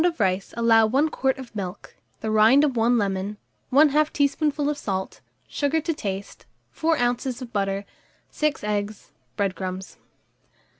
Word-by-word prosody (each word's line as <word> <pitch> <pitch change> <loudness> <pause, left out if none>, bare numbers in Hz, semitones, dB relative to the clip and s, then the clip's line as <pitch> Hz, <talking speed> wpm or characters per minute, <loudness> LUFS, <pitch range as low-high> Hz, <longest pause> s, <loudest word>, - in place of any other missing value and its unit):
of 345 -5 +1
rice 190 -1 0
allow 230 -1 +5
1 275 +7 +2
quart 265 -3 0
of 255 -4 -10
milk, 190 -1 -6 0.3
the 220 - -2
rind 220 +7 +6
of 280 -4 +1
1 235 +1 +3
lemon, 200 0 -1 0.3
1/2 300 +2 +4
teaspoonful 290 0 +1
of 295 - 0
salt, 190 -8 -4 0.3
sugar 290 +2 0
to 330 +2 -2
taste, 200 -7 -6 0.2
4 320 0 +1
oz. 245 +1 -1
of 250 -3 -9
butter, 195 -1 -1 0.5
6 305 -6 -1
eggs, 210 0 -3 0.3
bread 195 -2 0
crumbs. 185 0 -6
235 Hz, 150 wpm, -24 LUFS, 200-285 Hz, 0.5 s, rind